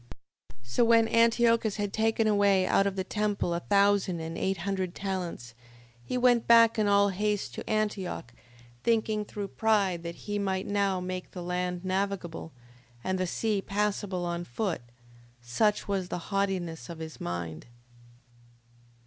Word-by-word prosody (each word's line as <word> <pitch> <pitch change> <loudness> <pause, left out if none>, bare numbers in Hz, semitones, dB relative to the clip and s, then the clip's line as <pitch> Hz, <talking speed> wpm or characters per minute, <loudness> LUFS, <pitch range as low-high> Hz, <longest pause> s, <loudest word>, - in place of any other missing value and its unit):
5:21. - - -19
So 120 - +1
when 230 -1 +5
Antiochus 230 -1 +3
had 205 -2 -3
taken 225 0 +1
away 200 -3 +3
out 195 +1 +3
of 195 - -2
the 190 - -1
temple 205 -3 -1
a 170 - -1
thousand 200 -2 +2
and 165 +1 -5
eight 190 +2 -1
hundred 190 -2 -2
talents, 180 - -4 0.5
he 250 - -3
went 245 -2 +3
back 230 -1 +6
in 210 - +2
all 200 0 +4
haste 205 +1 -1
to - - -7
Antioch, 205 - -2 0.5
thinking 220 -2 +1
through 205 -1 -6
pride 200 -6 +1
that 170 0 -6
he 205 0 -2
might 190 -1 -1
now 200 -2 +1
make 180 0 -5
the 180 - -7
land 180 0 -2
navigable, 185 -4 -2 0.5
and 185 0 -1
the 185 - 0
sea 210 +2 0
passable 200 -3 -1
on 175 0 -2
foot: 175 - -3 0.6
such 130 - 0
was 195 -3 -1
the 180 +2 -6
haughtiness 180 -8 -1
of 170 - -7
his 160 -1 -8
mind. 85 -1 -5
195 Hz, 155 wpm, -29 LUFS, 180-210 Hz, 0.6 s, back